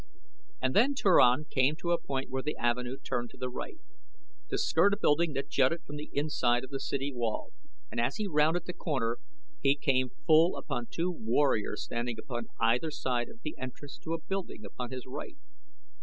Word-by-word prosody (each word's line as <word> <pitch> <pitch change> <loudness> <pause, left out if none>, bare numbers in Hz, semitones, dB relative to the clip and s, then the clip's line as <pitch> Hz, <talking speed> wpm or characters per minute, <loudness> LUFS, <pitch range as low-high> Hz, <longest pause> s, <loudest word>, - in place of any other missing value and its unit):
And - - 0
then 255 +7 +5
Turan 155 - +5
came 135 +1 +2
to 170 +2 -2
a 170 -1 +2
point 135 -1 -3
where 130 0 -1
the 150 +3 -3
avenue 125 +2 0
turned 120 -2 -3
to - - -16
the 125 -1 -3
right, 130 - -6 0.7
to - - -1
skirt 200 0 +4
a - - -13
building 160 -3 +3
that 135 +1 -2
jutted 140 +5 +2
from 150 - -7
the 150 - -7
inside 130 -4 +1
of 130 - -9
the 135 - -3
city 140 +1 -2
wall, 120 -3 -2 0.4
and - - 0
as 120 +3 0
he 215 - -2
rounded 160 +1 +2
the 180 - -4
corner 120 -9 -1 0.4
he 135 +1 +4
came 130 -3 +1 0.2
full 160 +1 +5
upon 120 -3 -3
two 175 +2 -1
warriors 115 -6 +1
standing 120 0 -3
upon 120 -2 -5
either 120 +8 +3
side 125 -5 -1
of 230 0 -15
the 155 - -4
entrance 130 +2 -7
to 165 +1 -2
a - - -4
building 190 - -4
upon 120 +4 -6
his 130 -1 -6
right. 145 - -7
135 Hz, 195 wpm, -31 LUFS, 125-160 Hz, 0.7 s, then